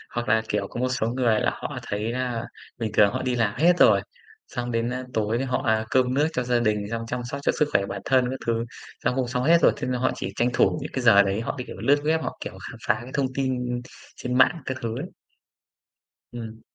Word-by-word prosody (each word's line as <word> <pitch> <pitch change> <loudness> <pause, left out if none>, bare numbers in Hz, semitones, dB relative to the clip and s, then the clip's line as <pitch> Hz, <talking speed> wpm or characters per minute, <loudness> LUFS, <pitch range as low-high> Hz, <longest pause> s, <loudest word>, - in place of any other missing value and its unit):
Hoặc 120 0 -2
là, 110 +1 +4
kiểu, - - -1
có - - -7
một 130 +1 +1
số 125 -3 0
người 120 -2 +2
là - - +2
họ - - -5
thấy 105 +2 -2
là 125 -2 -2 0.3
bình 110 -2 -3
thường 105 -1 +6
họ - - -2
đi 130 -1 0
làm 110 -4 +1
hết 175 +3 +5
rồi, - - +6 0.5
xong 120 0 -4
đến, 115 0 0
a, 130 0 -4
tối 110 +3 0
họ, 130 +1 -1
à, 110 -1 +2
cơm 130 -1 +3
nước 145 +3 +3
cho 125 - 0
gia 120 0 +1
đình, 105 -3 0
xong 115 0 -2
chăm 125 +1 -3
sóc 140 - -3
cho - - +3
sức 150 -1 +3
khỏe 100 - +2
bản - - -5
thân 130 -1 +3
các 130 - -4
thứ, 115 0 0 0.4
xong 125 +1 +1
cũng 130 -2 0
xong 125 0 -1
hết 165 +5 +6
rồi, - - +6
thế - - -3
nên 125 -1 -1
họ - - +2
chỉ 95 - -4
tranh 120 - +2
thủ 155 - +3
những 145 - -6
cái 130 - -1
giờ 100 -4 +7
đấy, 100 +2 -1
họ 115 - -3
cái, 125 - -5
kiểu, - - -8
lướt 145 +1 +3
web, 160 +1 +2
họ, - - -4
kiểu, - - -6 0.2
khám - - -10
phá 105 +1 +2
cái 125 - -10
thông 135 -2 0
tin 125 -2 -1 0.3
trên 125 0 -2
mạng 155 +6 +4
các 130 - -3
thứ 115 -1 -3
ấy. 165 - -4 1.3
Ừm. 115 -2 -7
125 Hz, 260 wpm, -25 LUFS, 115-130 Hz, 1.3 s, giờ